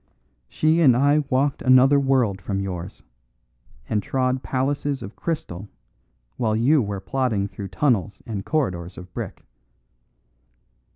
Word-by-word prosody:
She 160 +2 +2
and 130 -7 +6
I 145 +3 +4
walked 140 +2 +1
another 130 +2 +6
world 130 -8 +1
from 95 +1 -3
yours, 90 -2 -5 0.8
and 105 - 0
trod 130 +3 0
palaces 140 +2 -1
of 100 - -9
crystal 105 - -4 0.7
while 110 -2 +1
you 135 +7 +4
were 100 -3 -3
plodding 115 -3 -1
through 100 0 -7
tunnels 100 - 0
and 105 -5 -4
corridors 95 - -2
of 90 0 -11
brick. - - -6
125 Hz, 125 wpm, -23 LUFS, 100-135 Hz, 0.8 s, and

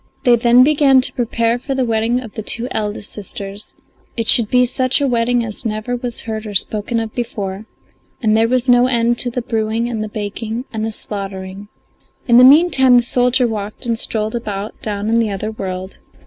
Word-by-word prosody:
They 245 -1 +5
then 240 +1 +5
began 280 -2 +4
to - - 0
prepare 235 0 -1
for 270 +2 -4
the 260 -1 0
wedding 230 +2 0
of 225 -4 -10
the 220 - -5
two 230 +3 0
eldest 210 -1 -3
sisters; 200 0 -7 0.4
it 230 - -1
should 230 -2 +5
be 250 0 +4
such 255 +2 +1
a 285 - +1
wedding 240 -1 +1
as 215 +1 -9
never 220 +2 -3
was 240 -1 -4
heard 220 -1 -5
or 205 - -7
spoken 215 +4 -1
of 225 -1 -5
before, 205 -3 -5 0.5
and 215 -2 +1
there 225 +1 +3
was 255 +1 0
no 245 0 +5
end 235 -1 +1
to 245 - 0
the 245 0 -4
brewing 225 0 -1
and 225 -3 -3
the 215 - -5
baking 220 +3 -5
and 220 -1 -3
the 225 - -2
slaughtering. 195 -1 -7 0.6
In 240 -1 +6
the - - +7
meantime 265 -3 +6
the 240 - +3
soldier 250 +1 +1
walked 215 +2 -4
and 230 -1 -1
strolled 215 -1 -2
about 210 -3 -5
down 205 -1 -3
in 230 +1 +2
the 225 -2 0
other 205 +2 -4
world. 190 -2 -6
230 Hz, 205 wpm, -17 LUFS, 215-245 Hz, 0.6 s, the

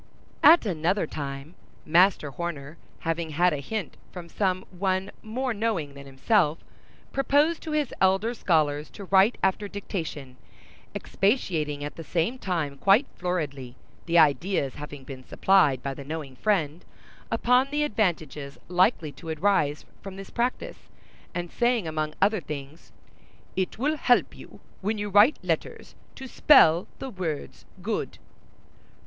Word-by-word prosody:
At 320 -2 +7
another 175 0 0
time, 140 +1 -6 0.3
Master 170 -2 +3
Horner, 155 -1 -6 0.2
having 165 0 -2
had 175 +3 +2
a - - -2
hint 200 +5 -5
from 175 -2 -9
some 185 -2 -1
one 190 +1 -1
more 245 +3 -3
knowing 205 -10 -2
than 140 0 -11
himself, 150 - +1 0.5
proposed 290 +4 +2
to 315 - -6
his 300 -3 0
elder 190 +5 +3
scholars 155 -8 +1
to 200 - -10
write 195 +4 +4
after 190 +2 +1
dictation, 160 -10 -6 0.6
expatiating 160 - -1
at 145 - -7
the 165 - -7
same 175 - -1
time 160 - -3
quite 200 +8 +5
floridly 145 -9 -3 0.3
(the 170 0 +2
ideas 160 -1 +3
having 145 -2 -9
been 130 -1 -9
supplied 150 -7 +3
by 140 - -3
the 140 - -9
knowing 145 -2 -6
friend), 165 -2 0 0.5
upon 250 +3 +3
the 295 +1 0
advantages 160 - -2
likely 180 -3 +2
to 160 +4 -11
arise 155 -3 +1 0.2
from 195 -1 -8
this 195 0 -10
practice, 245 +2 -3 0.5
and 175 -1 -4
saying, 240 -6 +1
among 155 -1 -3
other 205 0 +2
things, 145 +1 -8 0.6
"It 190 -1 -2
will 295 +6 0
help 245 -4 +2
you, - - -14 0.2
when 215 +3 -1
you 205 0 -3
write 205 +8 +5
letters, - - -3 0.2
to 265 - -8
spell 175 - +5
the 265 - -6
words 165 -7 -5 0.2
good." - - -3
180 Hz, 140 wpm, -26 LUFS, 150-210 Hz, 0.6 s, At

